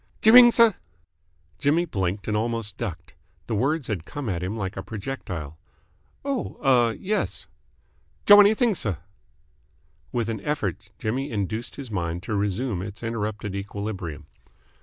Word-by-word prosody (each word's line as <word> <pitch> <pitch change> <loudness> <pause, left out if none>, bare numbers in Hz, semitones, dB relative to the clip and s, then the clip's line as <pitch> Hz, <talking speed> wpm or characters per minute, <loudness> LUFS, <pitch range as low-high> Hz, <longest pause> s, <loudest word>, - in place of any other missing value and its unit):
"Jer 220 - +7
ring, 245 +1 +11
S'?" 230 -2 +5 0.9
Jimmy 150 +5 +2
blinked 95 - -2
and 105 - 0
almost 115 -2 -1
ducked. 90 -1 -6 0.3
The 115 - -4
words 135 +6 0
had 95 -7 -3
come 140 - -5
at 90 -3 -2
him 95 +5 -3
like 95 -3 -3
a 95 - -4
projectile. 95 - -6 0.7
"Oh, 275 -3 -2
ah, 125 -4 +5
yes." 195 - -2 0.8
"J' 205 - +9
want 205 0 +10
anything, 225 +3 +3
s'?" 170 - -2 1.2
With 120 -3 -1
an 110 -3 -3
effort 100 - -3
Jimmy 130 +6 -2
induced 110 +2 -3
his 135 -5 -8
mind 85 -2 -2
to 110 - -4
resume 105 +1 -1
its 100 +4 -8
interrupted 105 -3 -3
equilibrium. 100 -6 -5
110 Hz, 145 wpm, -25 LUFS, 95-135 Hz, 1.2 s, ring